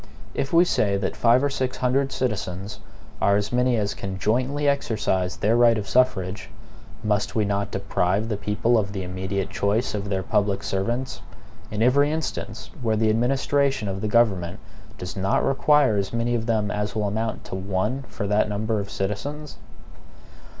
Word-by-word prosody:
If 135 - -2
we 170 +1 +6
say 100 - +1
that 95 -1 -2
five 120 +3 +4
or 145 - +2
six 130 -1 -2
hundred 135 +2 +1
citizens 100 -4 -3 0.4
are 100 - +4
as 105 +3 -1
many 125 -1 +2
as 100 -2 0
can 95 -1 -5
jointly 130 +8 0
exercise 105 -9 0
their 110 +3 +2
right 120 -1 +5
of 105 -2 -4
suffrage, 100 -7 +1 0.5
must 105 -1 0
we 110 -2 +2
not 100 0 -1
deprive 95 +1 0
the 110 - -1
people 105 +4 +1
of 100 -1 -3
the 95 -2 -3
immediate 95 +1 -3
choice 105 +5 0
of 100 -1 -3
their 95 -1 -1
public 100 0 0
servants, 115 +7 -2 0.5
in 105 +1 -1
every 140 +4 +4
instance 160 0 -4
where 110 -2 +1
the 110 0 +2
administration 135 +1 +1
of 95 0 -3
the 110 - -1
government 100 -6 +2 0.4
does 90 +1 -6
not 95 0 +1
require 135 -4 +3
as 100 -1 -1
many 115 +1 0
of 115 -1 -1
them 110 -3 +1
as 105 +1 -2
will 105 -1 0
amount 110 +2 -2
to - - -10
one 95 +7 -1
for - - -5
that 105 +1 +2
number 110 +1 -1
of 100 -1 -5
citizens? 140 +10 -4
105 Hz, 175 wpm, -24 LUFS, 100-125 Hz, 0.5 s, we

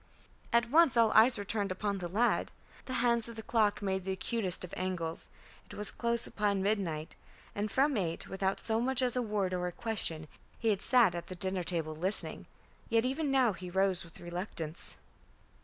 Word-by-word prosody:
At 235 0 +2
once 310 -5 +5
all 225 -2 +5
eyes 235 +3 +5
were 205 - -5
turned 205 -1 -2
upon 200 +1 -2
the 175 - -4
lad. 220 +7 +1 0.3
The 260 - -5
hands 235 -1 +4
of 230 - -9
the 220 - -7
clock 215 -3 +1
made 190 -1 -1
the 190 - -3
acutest 190 -2 +1
of 180 - -9
angles. 175 -3 -4 0.4
It - - -11
was 210 0 +5
close 235 0 -1
upon 200 -2 0
midnight; 180 -7 -2 0.4
and 210 +1 -2
from 275 +5 +2
eight, 170 -6 -2
without 195 0 -2
so 225 0 +1
much 260 +1 +2
as 250 -1 +2
a 250 - +1
word 205 -5 -1
or 180 0 -1
a - - -4
question, 170 -7 -3 0.3
he 225 - 0
had 200 -2 0
sat 240 -8 +4
at 170 -1 -6
the 185 - -7
dinner 185 0 +1
table 165 -3 -2
listening. 185 +6 0 0.4
Yet 230 +1 +2
even 280 +3 -1
now 260 -5 +3
he 180 0 -8
rose 190 0 +1
with 165 -1 -15
reluctance. 175 -2 -5
205 Hz, 195 wpm, -31 LUFS, 180-235 Hz, 0.4 s, once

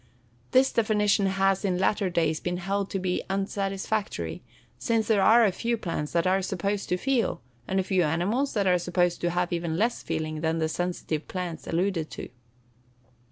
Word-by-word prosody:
This 260 +1 +4
definition 210 -3 +2
has, 195 0 +1
in 185 -3 +1
latter 195 +1 +1
days, 160 -3 +1
been 180 0 -2
held 195 +2 -2
to - - -2
be 185 -1 -1
unsatisfactory, 195 +2 -2 0.4
since 225 -2 +1
there 215 -3 +3
are 225 +3 +6
a 200 - +3
few 235 +5 -1
plants 165 -7 -3
that 170 -1 +2
are 190 +1 +3
supposed 195 +2 -2
to 180 - +1
feel, 260 +3 0 0.3
and 190 - 0
a - - +1
few 185 -1 +1
animals 190 - 0
that 205 -2 +1
are 180 -1 +4
supposed 175 0 0
to 175 - +1
have 175 0 -1
even 170 -1 -2
less 230 +5 +1
feeling 155 -1 -3
than 160 0 0
the 160 -1 +1
sensitive 170 -3 -3
plants 180 -4 -5
alluded 170 -2 0
to. - - -7
190 Hz, 180 wpm, -27 LUFS, 175-205 Hz, 0.4 s, are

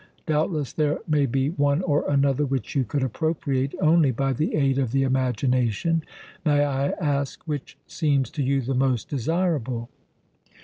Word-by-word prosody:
Doubtless 155 -2 0
there 150 -1 +1
may 150 -3 +2
be 135 +3 0
one 145 +1 +1
or 150 -5 +1
another 140 0 +2
which 135 -5 -2
you 135 - +3
could 130 +4 -2
appropriate 135 0 -1
only 155 -2 +4
by 135 +2 0
the 150 +6 -1
aid 135 -2 +2
of 130 -3 -1
the 135 0 +3
imagination. 130 +3 +1 0.4
May 145 -2 +3
I 140 0 0
ask 140 -4 -1
which 145 -3 -5
seems 140 -5 0
to 150 - -3
you 135 0 +1
the 135 +3 -2
most 130 -3 0
desirable?" 140 -5 -1
140 Hz, 160 wpm, -24 LUFS, 130-150 Hz, 0.4 s, only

